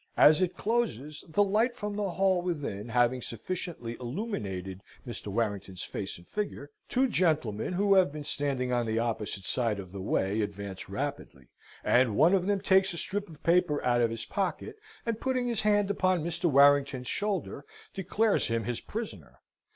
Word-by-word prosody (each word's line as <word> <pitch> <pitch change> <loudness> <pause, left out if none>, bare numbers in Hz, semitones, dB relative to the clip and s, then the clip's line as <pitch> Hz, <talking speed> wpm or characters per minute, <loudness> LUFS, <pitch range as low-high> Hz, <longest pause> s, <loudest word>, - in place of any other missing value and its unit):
As 155 +4 +7
it 185 -1 0
closes, 155 - -1
the 205 +6 +3
light 220 +5 +2
from 210 -4 -4
the 205 -1 -1
hall 190 0 +2
within 145 - -3
having 120 +1 +2
sufficiently 120 - -5
illuminated 105 - -4 0.2
Mr. 120 -5 -7
Warrington's 100 -3 -2
face 95 - -5
and 85 - -17
figure, 200 -9 -4 0.2
two 265 +2 +3
gentlemen, 155 - 0
who 200 +2 +3
have 185 -6 +5
been 150 0 -6
standing 140 -4 -1
on 120 -1 +1
the 110 0 0
opposite 110 -3 -2
side 115 -1 0
of 95 -2 -8
the 95 0 -6
way, 100 +2 0
advance 100 -2 -5
rapidly, 65 -3 -5 0.3
and 120 -4 +3
one 165 - +5
of 190 -1 +2
them 200 -1 +1
takes 190 -1 +3
a - - -6
strip 205 +3 -3
of 155 -3 -14
paper 170 -3 +3
out 120 -1 +3
of 115 - +3
his 115 -1 -5
pocket, 190 - -2 0.3
and 230 -2 -2
putting 255 -2 0
his 235 -3 0
hand 205 -1 +3
upon 185 -4 +1
Mr. 170 +1 -3
Warrington's 140 -3 +5
shoulder, 195 -5 -2 0.3
declares 200 +3 +1
him 115 0 0
his 120 +2 -3
prisoner. 225 +1 -7
145 Hz, 175 wpm, -29 LUFS, -, 0.3 s, As